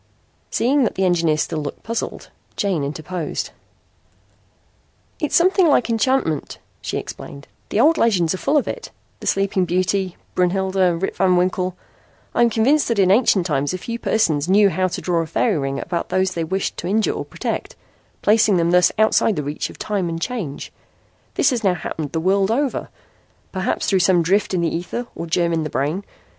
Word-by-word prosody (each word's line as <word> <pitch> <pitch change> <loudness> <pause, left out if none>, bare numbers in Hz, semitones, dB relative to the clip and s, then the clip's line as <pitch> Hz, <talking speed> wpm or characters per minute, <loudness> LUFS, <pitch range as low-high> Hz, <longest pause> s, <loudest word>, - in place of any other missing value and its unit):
Seeing 270 +4 +2
that 225 - 0
the 190 - +1
engineer 170 -4 +2
still 155 +1 -1
looked 145 -1 -6
puzzled, 230 +1 -4 0.2
June 190 -7 0
interposed: 155 +3 -4 1.7
"It's 300 - -1
something 370 +1 +4
like 250 -5 +3
enchantment," 225 - 0 0.2
she - - -3
explained. 140 0 -8 0.2
"The 205 - 0
old 315 +7 +4
legends 185 -8 +2
are 185 - -4
full 300 - +2
of 285 - +1
it 475 - -5 0.3
the - - -7
Sleeping 195 -1 +1
Beauty, 185 +1 0 0.2
Brunhilde, 185 -1 +1
Rip - - -1
Van 185 -1 +3
Winkle. 180 0 0 0.6
I - - +1
am 235 - +5
convinced 255 +7 +2
that 230 - 0
in 190 -2 +4
ancient 205 -4 +4
times 145 0 0
a - - -3
few 230 +5 -5
persons 165 -10 +1
knew 200 +1 +5
how 185 0 +1
to 180 - -5
draw 175 -2 0
a 165 - -4
fairy 175 +2 +1
ring 135 0 -2
about 170 +2 -3
those 185 0 +1
they 170 - -2
wished 190 +4 -2
to 175 - -4
injure 215 +3 +1
or - - -4
protect, - - -4 0.5
placing 215 -2 +4
them 170 0 +2
thus 180 0 +5
outside 220 0 +3
the 150 - -2
reach 145 +2 -3
of - - -12
time 195 -5 -2
and 165 0 -3
change. 170 - -5 0.6
This - - +3
has 240 -3 -2
now 190 -3 +3
happened 160 -3 -5
the 165 - -1
world 195 +3 +2
over, 265 +4 -1 0.6
perhaps 190 -1 -1
through 195 - +2
some 175 -1 +3
drift 195 +3 +1
in 175 - +1
the 165 -1 0
ether 180 +8 -4
or 170 - -6
germ 170 +1 +1
in 165 - +1
the 155 - -3
brain. 150 +9 -1
185 Hz, 190 wpm, -21 LUFS, 170-220 Hz, 1.7 s, am